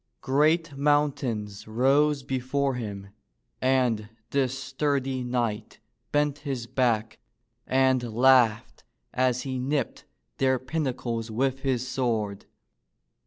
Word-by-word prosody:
Great 155 +3 +2
mountains 135 -8 0
rose 135 +5 +2
before 135 +2 -1
him, 100 -5 -6 0.5
and 125 -5 +1 0.2
this 135 -2 +1
sturdy 135 -1 -1
knight 120 -3 -2 0.3
bent 145 -1 +1
his 135 -6 -4
back, 115 -3 0 0.5
and 130 -1 +3
laughed 120 -1 +3 0.3
as 125 0 +1
he 130 -2 -3
nipped 140 +3 -2 0.3
their 130 -1 +3
pinnacles 130 -5 -3
with 130 +4 0
his 130 -2 -1
sword. 110 -6 -2
130 Hz, 100 wpm, -26 LUFS, 120-135 Hz, 0.5 s, and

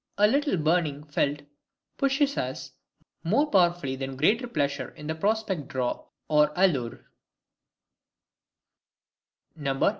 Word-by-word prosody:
A 210 - +5
little 280 0 +2
burning 155 -2 +1
felt 145 -1 -1 0.5
pushes 275 +1 +1
us 130 +1 -4 0.5
more 220 - +3
powerfully 175 -8 +2
than 135 0 -5
greater 225 - +2
pleasure 140 - -1
in 155 +1 -4
prospect 200 -7 0
draw 130 -4 -2 0.2
or 150 -1 +4
allure. 145 -11 +1
155 Hz, 95 wpm, -27 LUFS, 140-210 Hz, 0.5 s, A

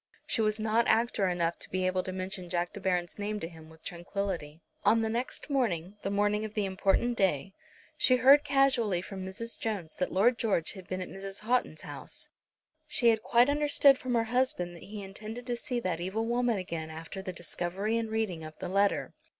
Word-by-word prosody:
She 230 - +1
was 215 0 +1
not 220 +2 +2
actor 225 -3 +3
enough 170 -1 0
to - - -6
be 185 0 0
able 185 0 +1
to 185 - -5
mention 185 -1 -4
Jack 175 0 -1
De - - -7
Baron's 180 -1 -1
name 210 +1 -2
to 165 - -4
him 160 -2 -13
with 160 0 -17
tranquillity. 175 -3 -4 0.2
On 225 +1 +5
the 220 - 0
next 240 +3 -3
morning, 205 - 0
the - - -2
morning 205 +1 +1
of 215 -1 -6
the 210 -2 +1
important 195 +5 +1
day, 195 -2 +1 0.4
she 255 - +5
heard 270 +4 +7
casually 265 -10 +2
from 190 -1 -6
Mrs. 210 +5 -6
Jones 200 -8 -3
that 180 - -1
Lord 230 +5 +3
George 195 -7 +1
had 190 -3 -10
been 185 0 -3
at 185 - -4
Mrs. 195 +1 -7
Houghton's 245 +3 0
house. - - -8 0.6
She 240 -5 +3
had 220 -1 +3
quite 240 +2 +4
understood 285 -1 +5
from 250 -1 -1
her 230 - +3
husband 215 -9 +1
that 170 - -12
he 205 0 -7
intended 215 +5 -8
to 245 - -1
see 245 0 -2
that 175 -5 -2
evil 200 +5 -1
woman 240 -1 +1
again 165 -4 -4
after 160 +4 -7
the 190 -1 -4
discovery 180 +4 -2
and 230 -1 -1
reading 215 -7 -1
of 155 0 -9
the 180 - -5
letter. 200 +2 +1
200 Hz, 205 wpm, -30 LUFS, 180-230 Hz, 0.6 s, heard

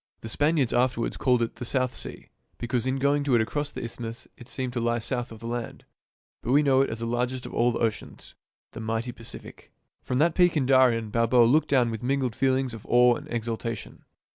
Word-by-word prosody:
The 110 - -7
Span 145 +7 +1
iards 130 -7 +1
afterwards 125 -1 +1
called 125 -3 +2
it 115 - -5
the - - -6
South 130 +1 0
Sea, - - -6 0.3
because 120 +1 -2
in 130 - +1
going 140 +2 +1
to 135 -3 +2
it 115 - +4
across 145 +6 -2
the - - -7
isthmus 115 0 -6
it 120 0 -14
seemed 130 -2 -3
to 125 - -1
lie 120 0 +1
south 120 +1 -3
of 110 -1 -11
the - - -8
land; 120 0 -5 0.6
but 120 - -3
we 145 +3 +5
know 135 -2 +4
it 135 - +1
as 110 0 -5
the - - -2
largest 125 +2 -2
of - - -8
all 120 +1 +2
the 115 - -3
oceans, 110 -3 -4 0.4
the - - -9
mighty 115 +2 -2
Pacific. 115 -1 -11 0.3
From 125 - -2
that 160 +4 +3
peak 175 -2 +3
in 135 - +1
Darien, 125 -4 +3
Balboa 115 +2 +4
looked 150 +7 +3
down 125 -4 +3
with 110 - -5
mingled 130 -2 -1
feelings 130 -2 +1
of 115 - -9
awe 125 0 +6
and - - -9
exultation. 115 -1 -4
120 Hz, 225 wpm, -26 LUFS, 115-130 Hz, 0.6 s, awe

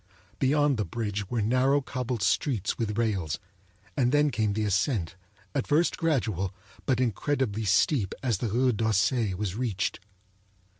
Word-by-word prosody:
Beyond 145 0 +3
the 105 - +1
bridge 105 +1 -3
were 120 -3 0
narrow 130 +5 +3
cobbled 125 -5 -3
streets 110 - +1
with 105 -2 -2
rails; 100 -10 0 0.6
and 125 -1 +2
then 145 0 +3
came 110 -4 0
the 110 +1 -1
ascent, 95 - 0 0.4
at 140 - -1
first 155 +4 +3
gradual, 110 - 0 0.3
but 130 -3 +2
incredibly 120 -2 0
steep 100 - +2
as 120 -7 +1
the 115 - -1
Rue 125 +4 +2
d'Auseil 110 -1 +1
was 100 -3 -2
reached. 105 -4 -2
115 Hz, 145 wpm, -28 LUFS, 100-130 Hz, 0.6 s, Beyond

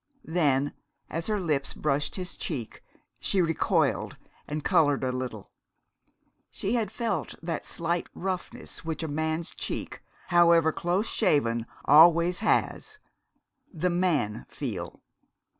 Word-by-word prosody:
Then, 145 -4 +1 0.4
as 165 +1 -2
her 210 -1 0
lips 150 -7 -1
brushed 145 -1 0
his 185 -1 -5
cheek, 130 -9 -5 0.4
she 195 - +1
recoiled 165 -3 +1 0.3
and 150 0 -4
colored 145 -4 +3
a 130 - +1
little. 125 -5 -5 1.0
She 200 - -2
had 230 -3 0
felt 235 -2 -2
that 165 -1 -3
slight 170 +1 -2
roughness 185 -2 -4
which 165 0 -4
a - - -2
man's 160 +2 -2
cheek, - - -5 0.3
however 170 -2 +5
close 175 +6 0
shaven, 120 - +1 0.2
always 170 +4 +6
has 435 0 0 0.7
the 180 0 0
man 170 - 0
feel. - - -5
165 Hz, 120 wpm, -27 LUFS, 145-180 Hz, 1.0 s, always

